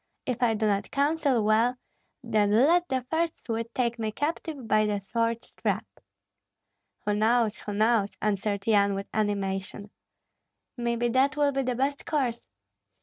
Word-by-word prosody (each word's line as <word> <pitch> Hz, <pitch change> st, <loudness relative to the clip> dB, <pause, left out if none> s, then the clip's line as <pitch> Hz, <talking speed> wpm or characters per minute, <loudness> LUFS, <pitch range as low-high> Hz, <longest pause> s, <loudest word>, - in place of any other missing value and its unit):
If 250 Hz, -1 st, -3 dB
I 230 Hz, -2 st, +3 dB
do 215 Hz, +1 st, 0 dB
not 200 Hz, -1 st, 0 dB
counsel 285 Hz, -4 st, +1 dB
well, 225 Hz, +4 st, +3 dB, 0.5 s
then 215 Hz, -3 st, +2 dB
let 310 Hz, +12 st, +4 dB
the 260 Hz, -2 st, -1 dB
first 330 Hz, 0 st, -1 dB
Swede 230 Hz, 0 st, -3 dB
take 235 Hz, -2 st, 0 dB
me 220 Hz, -1 st, -1 dB
captive 290 Hz, 0 st, -3 dB
by 215 Hz, 0 st, +3 dB
the 205 Hz, -1 st, -1 dB
sword 230 Hz, +3 st, -1 dB
strap." -, -, -2 dB, 1.2 s
"Who 210 Hz, -, +1 dB
knows, 220 Hz, +1 st, +2 dB
who 205 Hz, -, -6 dB
knows?" 215 Hz, -1 st, +2 dB
answered 200 Hz, -1 st, -1 dB
Yan, 200 Hz, -2 st, +3 dB
with 195 Hz, 0 st, -4 dB
animation. 200 Hz, -1 st, -2 dB, 0.8 s
"Maybe 240 Hz, -1 st, 0 dB
that 270 Hz, +4 st, +2 dB
will 290 Hz, -1 st, +3 dB
be 275 Hz, 0 st, 0 dB
the 250 Hz, -1 st, -1 dB
best 275 Hz, +3 st, -2 dB
course." 255 Hz, -7 st, 0 dB
230 Hz, 150 wpm, -27 LUFS, 210-260 Hz, 1.2 s, let